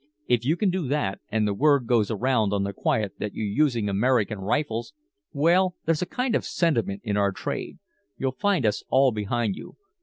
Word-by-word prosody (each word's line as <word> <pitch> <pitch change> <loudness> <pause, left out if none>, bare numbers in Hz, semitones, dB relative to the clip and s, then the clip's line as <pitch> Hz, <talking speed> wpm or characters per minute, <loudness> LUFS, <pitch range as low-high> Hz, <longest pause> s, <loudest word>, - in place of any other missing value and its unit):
If 120 -1 +2
you 155 +7 +1
can 200 -2 +2
do 180 -6 -2
that, 135 -8 -1
and 110 -1 +1
the 100 - 0
word 140 +2 +3
goes 115 -3 +2
around 110 -2 +1
on 100 -1 +1
the 100 0 -3
quiet 105 +1 -1
that 105 - -4
you're 110 - -2
using 115 0 +1
American 105 +1 +1
rifles 115 - -2 0.4
well, 175 +5 +3
there's 160 -1 +1
a 180 - -1
kind 250 -1 -1
of - - +2
a - - -12
sentiment 115 - 0
in 105 -3 -1
our 100 -1 +2
trade - - -5 0.4
you'll 130 -1 -1
find 195 - 0
us 105 -1 +1
all 130 +1 +4
behind 105 -1 -1
you. - - -11
120 Hz, 205 wpm, -25 LUFS, 105-150 Hz, 0.4 s, all